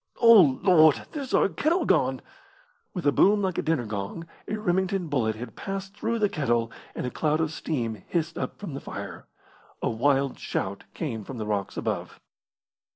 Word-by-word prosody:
O 210 - +7
Lord, 160 -5 +5
there's 280 -5 -5
our - - +4
kettle 325 - +1
gone!" - - +2 0.7
With 180 -5 -5
a 145 - +5
boom 205 +6 +4
like 185 -2 0
a - - +2
dinner 155 -7 0
gong 105 +10 -5 0.2
a 215 - -2
Remington 190 -3 0
bullet 115 -7 +1
had 115 +1 -8
passed 195 0 -5
through 230 +2 -1
the 210 -2 +3
kettle, 120 - 0 0.2
and - - -3
a 125 - -3
cloud 155 +3 0
of 160 -1 0
steam 115 -10 -3
hissed 165 -1 -1
up - - -4
from 195 -8 -7
the 140 - -5
fire. - - -7 0.5
A - - 0
wild 135 +3 +1
shout 100 +1 -3
came 120 -10 -3
from 130 +4 -8
the 110 - -3
rocks 100 -2 -2
above. - - -3
155 Hz, 180 wpm, -26 LUFS, 120-195 Hz, 0.7 s, O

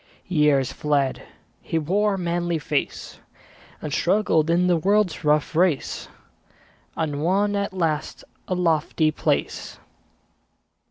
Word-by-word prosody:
Years 150 -7 +2
fled; 145 -3 0 0.4
he 165 - -2
wore 195 +6 +1
a - - -4
manly 175 -1 -1
face, 150 -1 -3 0.6
And 150 -2 -4
struggled 170 -4 +2
in 175 +2 +3
the 180 -1 +3
world's 200 +1 +1
rough 150 +1 +1
race, 170 -4 +1 0.9
And 150 -3 -2
won 200 +5 +1
at 200 0 -1
last 165 -5 -2 0.2
a 185 - -1
lofty 160 -2 +1
place. - - -2
165 Hz, 115 wpm, -23 LUFS, 150-185 Hz, 0.9 s, in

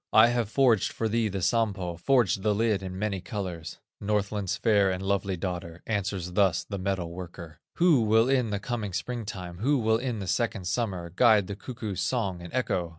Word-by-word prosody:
I 110 +2 +8
have 120 -3 0
forged 120 -5 +3
for 115 - -2
thee 115 +1 +1
the 95 -3 -3
Sampo, 95 -4 0
Forged 100 0 +2
the 105 0 +1
lid 110 -2 +1
in 95 -1 -6
many 100 -2 -2
colors." 90 - -5 0.2
Northland's 100 -1 -1
fair 100 -2 +3
and 95 0 -2
lovely 95 -1 0
daughter 90 -1 -5
Answers 100 -4 -2
thus 90 -3 +2
the 100 -2 -5
metal 95 -3 -2
worker: 85 -2 -9 0.2
"Who 165 -7 +4
will 110 +2 +4
in 130 -4 +2
the 105 - -1
coming 105 -2 -4
spring 115 +4 -3
time, 90 -3 -7
Who 140 +7 +2
will 110 -2 +2
in 125 -2 -2
the 100 - -4
second 110 0 -1
summer, 90 -3 -2
Guide 110 -3 +5
the 100 - -5
cuckoo's 110 -4 -5
song 95 -4 -1
and 85 - -9
echo? 95 -9 -1
100 Hz, 195 wpm, -27 LUFS, 90-115 Hz, 0.2 s, I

